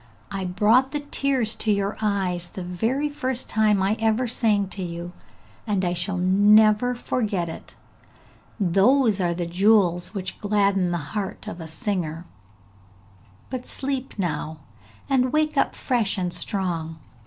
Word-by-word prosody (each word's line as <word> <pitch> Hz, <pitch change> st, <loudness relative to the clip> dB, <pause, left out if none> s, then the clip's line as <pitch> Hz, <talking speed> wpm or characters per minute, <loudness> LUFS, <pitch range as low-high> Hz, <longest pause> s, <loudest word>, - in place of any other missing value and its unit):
'I 195 Hz, -1 st, -3 dB
brought 220 Hz, +9 st, +3 dB
the 295 Hz, -, -1 dB
tears 275 Hz, -5 st, 0 dB
to 220 Hz, -, 0 dB
your 200 Hz, 0 st, 0 dB
eyes, 185 Hz, -4 st, -1 dB
the 185 Hz, -, -7 dB
very 225 Hz, +11 st, -1 dB
first 260 Hz, -3 st, -2 dB
time 210 Hz, -3 st, +3 dB
I 200 Hz, +3 st, +2 dB
ever 225 Hz, +3 st, +1 dB
sang 215 Hz, -4 st, +1 dB
to 195 Hz, -, -7 dB
you, 170 Hz, 0 st, -5 dB, 0.6 s
and 200 Hz, -3 st, 0 dB
I 175 Hz, -, 0 dB
shall 180 Hz, +2 st, -2 dB
never 210 Hz, +5 st, +4 dB
forget 210 Hz, -7 st, -1 dB
it! 160 Hz, -, -9 dB, 0.8 s
Those 205 Hz, +4 st, +3 dB
are 170 Hz, -1 st, 0 dB
the 175 Hz, 0 st, -2 dB
jewels 180 Hz, 0 st, +2 dB
which 185 Hz, -2 st, -5 dB
gladden 200 Hz, -3 st, +2 dB
the 175 Hz, -, 0 dB, 0.2 s
heart 210 Hz, 0 st, -4 dB
of 180 Hz, -5 st, -6 dB
a 160 Hz, -, -7 dB
singer; 170 Hz, -3 st, -3 dB, 1.3 s
but 255 Hz, -1 st, -5 dB
sleep 270 Hz, -2 st, -3 dB
now, 160 Hz, -4 st, -3 dB, 0.5 s
and 255 Hz, -2 st, +2 dB
wake 305 Hz, +1 st, +1 dB
up -, -, +1 dB
fresh 230 Hz, -6 st, 0 dB
and 180 Hz, -2 st, -2 dB
strong! 170 Hz, -5 st, -2 dB
200 Hz, 145 wpm, -24 LUFS, 180-230 Hz, 1.3 s, never